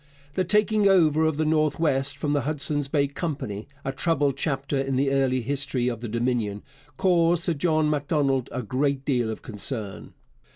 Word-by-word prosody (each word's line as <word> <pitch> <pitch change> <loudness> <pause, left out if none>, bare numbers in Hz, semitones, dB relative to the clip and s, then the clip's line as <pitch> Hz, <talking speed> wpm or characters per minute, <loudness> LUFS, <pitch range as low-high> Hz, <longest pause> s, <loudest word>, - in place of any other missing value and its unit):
The 185 - 0
taking 210 +2 +3
over 160 -5 +4
of 160 -2 0
the 155 - +1
North 155 -1 +1
West 140 -3 +1
from 145 -1 -1
the 145 - +1
Hudson's 145 0 0
Bay 140 -1 +1
Company 135 - -5 0.2
a 135 - -1
troubled 145 -2 0
chapter 140 -1 -2
in 135 0 -1
the 135 +1 +1
early 135 -2 +1
history 135 -1 0
of 115 -2 -5
the 120 - -4
Dominion 115 -3 -1 0.3
caused 170 -1 +3
Sir 175 - +1
John 155 0 +1
Macdonald 145 -3 0
a 125 +1 -4
great 135 +4 -1
deal 125 -5 0
of 110 - -6
concern. 105 -1 -4
140 Hz, 175 wpm, -25 LUFS, 130-155 Hz, 0.3 s, over